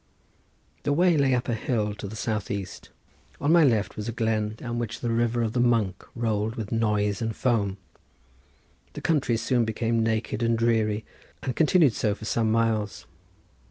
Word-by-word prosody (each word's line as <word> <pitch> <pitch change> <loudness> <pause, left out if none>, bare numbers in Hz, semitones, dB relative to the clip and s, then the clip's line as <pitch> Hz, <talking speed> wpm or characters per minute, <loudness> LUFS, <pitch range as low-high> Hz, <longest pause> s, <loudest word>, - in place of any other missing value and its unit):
The 145 - 0
way 175 +2 +4
lay 135 -3 +3
up 125 - -2
a 120 - 0
hill 110 -2 -1
to 105 0 -7
the 105 - -8
south 105 -2 -2
east; 100 -3 -5 0.5
on 145 +2 +1
my 170 -1 +6
left 110 -7 +2
was 105 +2 -4
a - - -1
glen 110 -2 -1
down 120 +1 -4
which 115 -1 -4
the 120 - -2
river 120 +1 +1
of 110 -1 -2
the 125 - 0
Monk 115 -6 +1
rolled 110 -1 -1
with 110 -4 -5
noise 105 -1 +1
and 110 -1 -2
foam. 105 -6 0 1.2
The - - -7
country 140 -8 +1
soon 120 +2 +1
became 115 +1 0
naked 110 0 -1
and 115 0 +2
dreary 110 -2 +1 0.4
and 125 - -2
continued 160 -4 +4
so 105 -1 0
for 110 - -10
some 110 0 +1
miles. 110 -2 0
115 Hz, 180 wpm, -26 LUFS, 105-120 Hz, 1.2 s, my